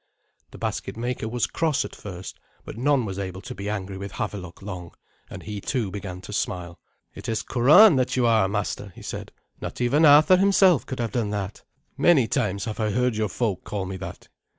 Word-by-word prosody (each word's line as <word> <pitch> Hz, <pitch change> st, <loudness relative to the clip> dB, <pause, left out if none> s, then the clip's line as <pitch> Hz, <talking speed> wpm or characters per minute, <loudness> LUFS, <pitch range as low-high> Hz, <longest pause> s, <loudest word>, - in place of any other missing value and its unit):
The -, -, -12 dB
basket -, -, -4 dB
maker 120 Hz, -1 st, -3 dB
was 120 Hz, 0 st, 0 dB
cross 160 Hz, -4 st, 0 dB
at -, -, -9 dB
first, 95 Hz, -3 st, -8 dB, 0.3 s
but -, -, -8 dB
none 130 Hz, +1 st, +2 dB
was 95 Hz, -1 st, -5 dB
able 95 Hz, -1 st, -5 dB
to 125 Hz, +4 st, -7 dB
be 100 Hz, -3 st, -5 dB
angry 100 Hz, -2 st, -4 dB
with 100 Hz, 0 st, -7 dB
Havelok 100 Hz, -3 st, -5 dB
long, 90 Hz, -4 st, -7 dB, 0.3 s
and -, -, -9 dB
he 105 Hz, -1 st, -6 dB
too 110 Hz, -4 st, -2 dB
began 95 Hz, -2 st, -6 dB
to 105 Hz, -, -9 dB
smile. 90 Hz, -3 st, -3 dB, 0.3 s
"It -, -, -7 dB
is 110 Hz, -, -1 dB
'curan' 150 Hz, -, +6 dB
that 130 Hz, -1 st, +1 dB
you 125 Hz, -2 st, +2 dB
are, 110 Hz, -4 st, +4 dB
master," 100 Hz, 0 st, -3 dB
he -, -, -12 dB
said; -, -, -6 dB, 0.3 s
"not -, -, -6 dB
even 130 Hz, +6 st, +3 dB
Arthur 155 Hz, +5 st, +7 dB
himself 190 Hz, -4 st, +4 dB
could 130 Hz, -, -5 dB
have 115 Hz, -3 st, -1 dB
done 110 Hz, -1 st, -1 dB
that." 100 Hz, -1 st, -4 dB, 0.4 s
"Many 145 Hz, -9 st, +5 dB
times 105 Hz, -6 st, -1 dB
have 110 Hz, -1 st, -5 dB
I 110 Hz, -1 st, +1 dB
heard 125 Hz, +2 st, +1 dB
your 110 Hz, -1 st, 0 dB
folk 105 Hz, -1 st, -2 dB
call 100 Hz, -2 st, -4 dB
me 95 Hz, +1 st, -5 dB
that. 95 Hz, -1 st, -8 dB
110 Hz, 205 wpm, -25 LUFS, 95-125 Hz, 0.4 s, Arthur